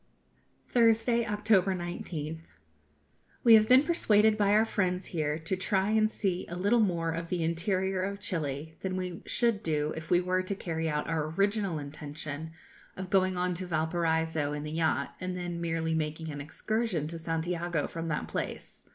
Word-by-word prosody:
Thursday, 230 0 +3
October 210 -3 +2
19th. 165 -2 -6 0.9
We 230 - +8
have 215 0 +7
been 255 +2 +7
persuaded 220 -10 +4
by 205 -2 +2
our 215 +1 +5
friends 185 -4 -1
here 150 -2 0
to 165 +4 -2
try 190 +1 +1
and 215 0 +3
see 190 -4 -2
a 175 - -6
little 205 +6 +2
more 170 -6 +1
of 165 +1 -4
the 175 -2 -1
interior 185 +3 0
of 200 +1 -3
Chili 160 -5 -3
than 185 -1 -2
we 180 -2 -4
should 235 -4 +1
do 150 -3 0
if 160 0 -7
we 175 - +5
were 185 +1 +1
to 185 +2 -3
carry 165 -3 -2
out 150 -1 -1
our 160 -2 -1
original 200 0 0
intention 150 +1 -6 0.5
of 190 0 -6
going 185 -2 +3
on 180 0 0
to 180 +1 -4
Valparaiso 160 -2 0
in 150 0 -4
the 150 - -5
yacht, 160 -3 0
and 185 0 -3
then 175 -1 -4
merely 165 -1 -1
making 155 0 -2
an 145 -1 -6
excursion 185 +2 -2
to 165 +1 -6
Santiago 165 0 -1
from 165 0 -5
that 150 -2 -2
place. - - -5
175 Hz, 175 wpm, -30 LUFS, 160-200 Hz, 0.9 s, We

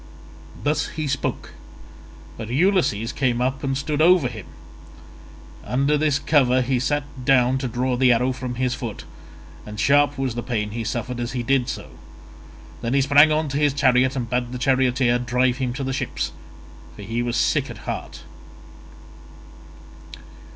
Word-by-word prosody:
Thus 150 +4 0
he 155 - -1
spoke, 140 +1 -3 0.8
but 110 -1 -7
Ulysses 135 - +1
came 125 -3 0
up 130 +2 -1
and 135 -1 -1
stood 145 +1 -2
over 175 -4 +5
him. 110 -5 -9 1.2
Under 140 +4 +1
this 150 -1 +2
cover 130 -4 +3
he 130 0 0
sat 145 +3 0 0.2
down 130 0 +3
to 130 - -2
draw 125 +2 -1
the 125 0 +4
arrow 125 +2 +2
from 125 -1 -5
his 125 0 0
foot, 120 -4 -6 0.6
and 105 0 -9
sharp 145 +5 +3
was 135 -3 -1
the 120 - -4
pain 110 -4 -3
he 115 +1 -4
suffered 120 +2 -4
as 120 0 -3
he 125 -2 -2
did 130 0 +1
so. - - -6 0.9
Then 120 +3 -1
he 140 - +4
sprang 145 +3 +6
on 155 0 +1
to 140 - -2
his 145 -2 +2
chariot 130 -1 +3
and 125 -3 -3
bade 125 +1 -2
the 125 - -4
charioteer 130 -1 +2
drive 125 +1 +1
him 130 -2 -2
to 135 +2 -4
the 135 0 -2
ships, 135 - -3 0.6
for - - -10
he 115 +4 -2
was 120 0 -1
sick 145 0 +1
at 115 -3 -10
heart. - - -6
130 Hz, 165 wpm, -22 LUFS, 120-140 Hz, 1.2 s, sprang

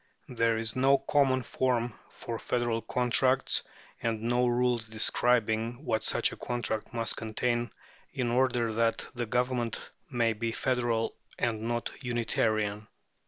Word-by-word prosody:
There 115 -2 +1
is 110 -1 -1
no 135 +2 +5
common 135 -1 +2
form 120 -3 0 0.2
for 115 -1 -6
federal 120 -2 0
contracts, 130 +2 +2 0.4
and 115 -1 -1
no 120 +1 +2
rules 120 -1 +1
describing 115 +3 +1
what 110 - 0
such - - +2
a - - -8
contract 120 -3 -2
must 115 -2 -1
contain 120 +1 -1 0.4
in 120 -2 -1
order 120 -2 +2
that 115 0 +1
the 120 -2 -3
Government 125 -1 -1 0.2
may 120 -4 +1
be 115 +1 -3
federal 120 -3 0 0.2
and 115 -2 0
not 120 +1 -2
unitarian. 110 -3 0
120 Hz, 130 wpm, -29 LUFS, 115-125 Hz, 0.4 s, no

